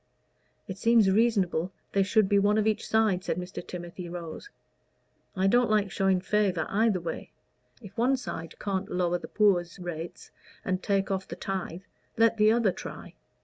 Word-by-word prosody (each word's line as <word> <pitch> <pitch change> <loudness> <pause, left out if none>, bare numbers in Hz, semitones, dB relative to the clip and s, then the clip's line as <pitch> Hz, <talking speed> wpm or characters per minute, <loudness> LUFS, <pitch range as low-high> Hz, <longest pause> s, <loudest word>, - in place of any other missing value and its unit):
"It 190 -1 -7
seems 230 -4 +4
reasonable 190 -5 +2 0.2
there 195 - +3
should 210 +1 +3
be 200 +1 +3
one 205 +1 +3
of 215 - +2
each 220 -1 0
side," 215 -5 +2
said 170 - -2
Mr. 180 0 -6
Timothy 175 0 -7
Rose. 170 - -7 0.9
"I 190 0 +1
don't 240 +4 +4
like 210 -2 +2
showing 190 -1 +1
favor 195 -4 +1
either 215 -2 +2
way. 170 - -6 0.5
If 200 -1 -11
one 260 +3 +3
side 165 -9 -7
can't 195 -1 -3
lower 175 -1 0
the - - -8
poor's 185 -5 +2
rates 175 -2 -7 0.3
and 185 0 -1
take 195 0 0
off 190 0 -2
the - - -6
tithe, 190 -2 -4 0.4
let 230 0 +4
the 215 0 +5
other 225 -4 +3
try." - - -9
195 Hz, 170 wpm, -28 LUFS, 180-215 Hz, 0.9 s, the